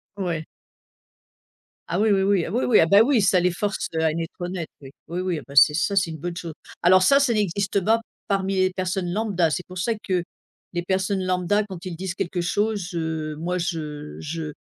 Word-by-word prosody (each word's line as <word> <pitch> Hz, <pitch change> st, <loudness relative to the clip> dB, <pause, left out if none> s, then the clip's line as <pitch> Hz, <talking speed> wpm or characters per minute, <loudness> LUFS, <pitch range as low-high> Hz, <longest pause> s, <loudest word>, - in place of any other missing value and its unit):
Ouais. 170 Hz, -5 st, -3 dB, 1.4 s
Ah, 175 Hz, +3 st, -1 dB
oui, 220 Hz, 0 st, +3 dB
oui, 195 Hz, -1 st, +3 dB
oui, 195 Hz, -3 st, +2 dB
ah, -, -, -5 dB
oui, 245 Hz, -, 0 dB
oui, 240 Hz, -, +5 dB
ah, -, -, +6 dB
bah, 200 Hz, +5 st, +6 dB
oui! 255 Hz, -4 st, +3 dB
Ça 185 Hz, -1 st, +4 dB
les 180 Hz, 0 st, +2 dB
force, 205 Hz, +3 st, -2 dB
heu, 160 Hz, -, +1 dB
à 160 Hz, -, +3 dB
être 165 Hz, +3 st, -5 dB
honnête 175 Hz, -2 st, -3 dB
oui. 135 Hz, -1 st, -11 dB, 0.2 s
Oui, 175 Hz, +2 st, -3 dB
oui, 180 Hz, -4 st, -1 dB
ah, -, -, -12 dB
bah, 140 Hz, -, -11 dB
c'est 150 Hz, +2 st, +7 dB
ça 195 Hz, +5 st, 0 dB
c'est 175 Hz, -4 st, +2 dB
une 160 Hz, -, -6 dB
bonne 170 Hz, +3 st, -5 dB
chose. 165 Hz, -3 st, -6 dB, 0.3 s
Alors 185 Hz, +2 st, +6 dB
ça 275 Hz, +8 st, +6 dB
ça 265 Hz, -4 st, +2 dB
n'existe 200 Hz, -1 st, 0 dB
bas 220 Hz, +4 st, +2 dB, 0.3 s
parmi 195 Hz, -1 st, 0 dB
les 185 Hz, 0 st, +2 dB
personnes 185 Hz, -1 st, -2 dB
lambda, 195 Hz, -5 st, +1 dB
c'est 180 Hz, -, -2 dB
pour 185 Hz, 0 st, -9 dB
ça 225 Hz, +6 st, 0 dB
que, 180 Hz, -2 st, +1 dB, 0.5 s
les 175 Hz, 0 st, -2 dB
personnes 190 Hz, +1 st, 0 dB
lambda 185 Hz, +3 st, +1 dB
quand 185 Hz, -3 st, -8 dB
ils 175 Hz, -2 st, -5 dB
disent 185 Hz, 0 st, -4 dB
quelque 175 Hz, 0 st, -2 dB
chose, 205 Hz, +1 st, -1 dB
heu, 160 Hz, -2 st, -3 dB
moi 180 Hz, +2 st, -2 dB
je 150 Hz, -4 st, -4 dB
je 155 Hz, 0 st, -5 dB
180 Hz, 220 wpm, -24 LUFS, 165-195 Hz, 1.4 s, c'est